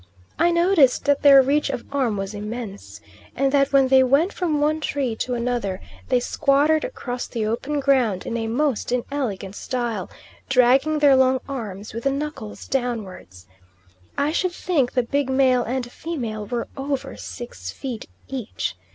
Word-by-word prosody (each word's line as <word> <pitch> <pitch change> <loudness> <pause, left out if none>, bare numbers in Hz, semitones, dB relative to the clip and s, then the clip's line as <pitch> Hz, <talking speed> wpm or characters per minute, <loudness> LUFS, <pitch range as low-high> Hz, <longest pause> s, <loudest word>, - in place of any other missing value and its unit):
I 340 - +4
noticed 340 -6 +3
that 285 0 +2
their 275 -2 +8
reach 290 +2 +1
of 255 -3 -3
arm 255 -7 0
was 195 +1 -4
immense, 205 - -7 0.3
and 270 +1 +1
that 275 0 +3
when 270 -2 +4
they 265 0 +6
went 280 +9 +3
from 320 -5 0
one 305 +2 +1
tree 275 -6 -2
to 250 +2 -2
another, 235 -6 -2 0.3
they 250 -2 +3
squattered 285 +5 +2
across 250 - -5
the 225 -2 -3
open 265 +7 -2
ground 255 -9 +2
in 235 - -3
a 225 -1 -2
most 250 0 0
inelegant 240 -6 -3
style, 235 -7 -3 0.4
dragging 265 +4 +4
their 290 -2 +6
long 260 0 +4
arms 215 -7 -6
with 230 +3 -6
the 275 - +3
knuckles 280 -6 -5
downwards. 210 - -4 0.7
I 285 +2 +1
should 355 +2 0
think 300 -10 0
the 250 - +2
big 280 +2 -1
male 260 -2 +3
and 245 0 -3
female 230 -12 -5
were 240 -1 -3
over 275 - -3
six 95 -1 -8
feet 245 - -6 0.2
each. 225 - -4
255 Hz, 160 wpm, -23 LUFS, 225-280 Hz, 0.7 s, their